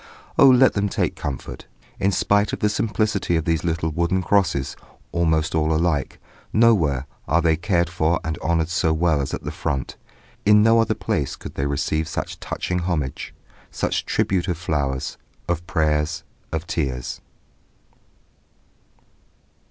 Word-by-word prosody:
Oh 135 - +7
let 130 0 +6
them 100 0 0
take - - -1
comfort! 70 -3 -6 0.3
In 100 - +2
spite 100 +2 +2
of - - -2
the 105 - +2
simplicity 105 -3 0
of 80 -1 0
these 80 -2 0
little 80 -1 -1
wooden 85 +4 0
crosses, 90 -9 +1 0.4
almost 80 -1 +1
all 80 -1 +1
alike, 80 -3 0 0.3
nowhere 85 - +3 0.2
are 80 +5 +3
they 80 -1 +3
cared 85 +1 +1
for 85 0 +1
and 80 0 -2
honoured 85 -1 0
so 80 -1 +1
well 80 -2 +2
as 70 - -3
at - - -9
the - - -4
front; 70 -3 -3 0.5
in 105 0 +6
no 115 +1 +5
other 115 - +2
place - - -2
could - - -9
they 70 - -1
receive 75 +2 -1
such - - -4
touching 90 0 -3
homage, 85 -7 -2 0.4
such - - -2
tribute 95 -2 0
of 90 -4 -1
flowers, 75 -5 -2 0.3
of 85 0 -2
prayers, 80 -1 0 0.3
of 80 0 -3
tears. 65 -8 -3
85 Hz, 150 wpm, -22 LUFS, 75-95 Hz, 0.5 s, Oh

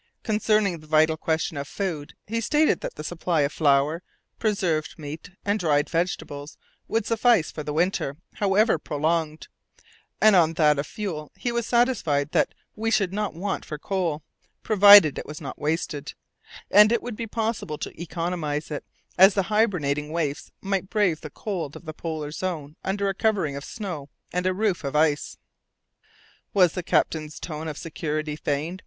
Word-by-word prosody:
Concerning 210 -4 +1
the 155 - -16
vital 155 +1 +4
question 160 -1 -1
of 140 0 -4
food, 160 -7 -4
he 230 +2 -2
stated 300 +6 +2
that - - -5
the 150 - -7
supply 170 0 -1
of 140 +1 0
flour, 145 +2 +2 0.4
preserved 180 -9 0
meat, 155 +1 -8 0.2
and 205 +1 +1
dried 150 -4 +2
vegetables 155 -4 -3 0.3
would 225 -2 0
suffice 230 -6 +3
for 155 - -6
the 150 - -4
winter, 160 -3 0 0.2
however 205 +3 +3
prolonged, 155 +1 -1 0.7
and 215 -2 +6
on 165 -2 +4
that 150 -3 +3
of 140 - -2
fuel 165 -8 -5
he 245 - -2
was 235 -1 -2
satisfied 195 - +1
that - - +1 0.2
we 225 +2 -1
should 200 -4 +1
not 210 -4 -2
want 195 +4 -3
for 150 - -6
coal, 165 -3 -2 0.4
provided 205 -7 +8
it - - -7
was 150 +1 -7
not 140 -4 -7
wasted; 150 -1 -2 0.6
and 210 +2 +7
it 235 - +1
would 245 -2 -5
be 230 +1 -5
possible 220 -8 -2
to - - -7
economize 165 -3 -3
it, 150 - -4 0.4
as 190 +1 +8
the 195 0 0
hibernating 150 -10 +1
waifs 160 0 -2
might 195 -1 -2
brave 195 -7 +1
the 155 - -7
cold 170 -3 -5
of - - -11
the 155 - -6
polar 155 -2 -5
zone 155 -4 -4
under 200 +1 -1
a 195 - 0
covering 190 -8 0
of 140 - -6
snow 175 -11 -6 0.2
and 180 +1 0
a - - +3
roof 195 -4 0
of 140 +1 -3
ice. 150 -1 +1 1.2
Was 180 -4 +5
the 180 - -3
captain's 155 -2 0
tone 160 -1 -5
of 150 -2 -5
security 155 -2 -3
feigned? 155 +4 -2
165 Hz, 170 wpm, -25 LUFS, 150-200 Hz, 1.2 s, provided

